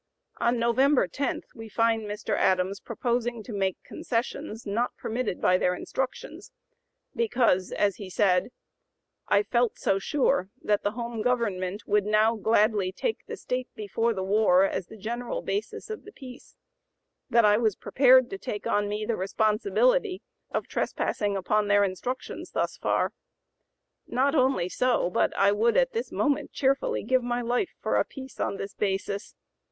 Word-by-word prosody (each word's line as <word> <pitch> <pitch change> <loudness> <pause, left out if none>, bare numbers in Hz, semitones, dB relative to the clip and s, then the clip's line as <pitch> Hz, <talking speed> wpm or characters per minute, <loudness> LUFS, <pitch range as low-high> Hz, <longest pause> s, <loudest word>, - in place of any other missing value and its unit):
On 240 +1 +1
November 250 +1 +3
10 275 +9 -2
we 225 -1 -10
find 225 0 +1
Mr. 210 0 -2
Adams 185 +1 +1
proposing 235 -1 -2
to 225 - -8
make 195 -2 0
(p. - - -15
087) - - -7
concessions 235 0 -3
not 225 +4 -1
permitted 230 -4 -3
by 185 0 +3
their 180 0 +1
instructions, 265 - -5 0.6
because, 245 - +2
as 200 -2 +1
he 200 -3 -8
said: 185 +1 +2 0.8
"I 200 - +4
felt 240 0 +1
so 195 - +1
sure 270 -3 +1
that 210 -1 +1
[the 205 - -1
home 235 -1 -4
government] 205 -5 -1
would 205 -1 +1
now 215 +2 +3
gladly 215 -3 +2
take 445 - -2
the - - -6
state 250 0 -3
before 225 +1 -1
the 190 - -2
war 195 -2 +4
as 190 -2 -1
the 220 - -12
general 240 - -4
basis 410 +2 -3
of 435 - -6
the 415 - -12
peace, 260 -8 -12 0.7
that 235 -2 +5
I 210 0 +5
was 220 -4 +1
prepared 260 -1 +5
to 390 - -5
take 215 - -5
on 205 0 +1
me 210 +1 -2
the 230 - 0
responsibility 370 - +1 0.3
of - - -3
trespassing 205 -2 -1
upon 205 +3 +1
their 205 0 +4
instructions 200 +7 -4
thus - - -1
far. - - 0 0.9
Not 265 +3 +1
only 260 - +2
so, 240 -2 +1
but - - +2
I 200 0 +5
would 225 +3 +2
at - - +3
this 465 +1 -3
moment 290 -1 0
cheerfully 270 0 +1
give 255 -1 +2
my 245 0 -2
life 245 - -1
for - - 0
a - - +4
peace 265 -1 -11
on 200 - -1
this 195 0 -6
basis. 200 +1 -3
225 Hz, 165 wpm, -27 LUFS, 205-255 Hz, 0.9 s, that